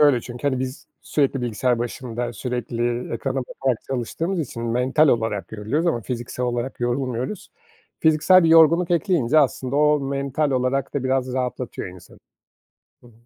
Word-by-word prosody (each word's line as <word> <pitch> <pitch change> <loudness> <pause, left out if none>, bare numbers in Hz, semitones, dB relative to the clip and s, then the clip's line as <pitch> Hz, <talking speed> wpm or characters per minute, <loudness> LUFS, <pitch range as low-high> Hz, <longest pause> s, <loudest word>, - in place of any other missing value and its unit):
şöyle 145 -5 +5
çünkü, 120 +4 -3
hani, 130 -2 -1
biz 130 +1 -5 0.2
sürekli 140 -2 0
bilgisayar 120 +1 0
başında, 120 0 -4
sürekli 120 0 -3
ekrana 135 +3 -2
bakarak 130 -1 -2
çalıştığımız 160 +9 -2
için 120 -5 -5
mental 125 +6 +2
olarak 110 -6 0
yoruluyoruz 110 +10 -1
ama 140 -9 +1
fiziksel 120 +1 -4
olarak 120 +1 -3
yorulmuyoruz. 125 - -2 0.5
Fiziksel 160 +3 +5
bir - - +4
yorgunluk 165 +2 +6
ekleyince, 165 - +2
aslında, 135 -2 +1
o 150 0 +4
mental 140 +2 -1
olarak 130 +1 0
da 140 -2 -1
biraz 130 -1 0
rahatlatıyor 125 -4 -3
insanı. 90 -1 -14 0.8
Hı 120 - -17
hı. - - -18
130 Hz, 150 wpm, -23 LUFS, 120-145 Hz, 0.8 s, yorgunluk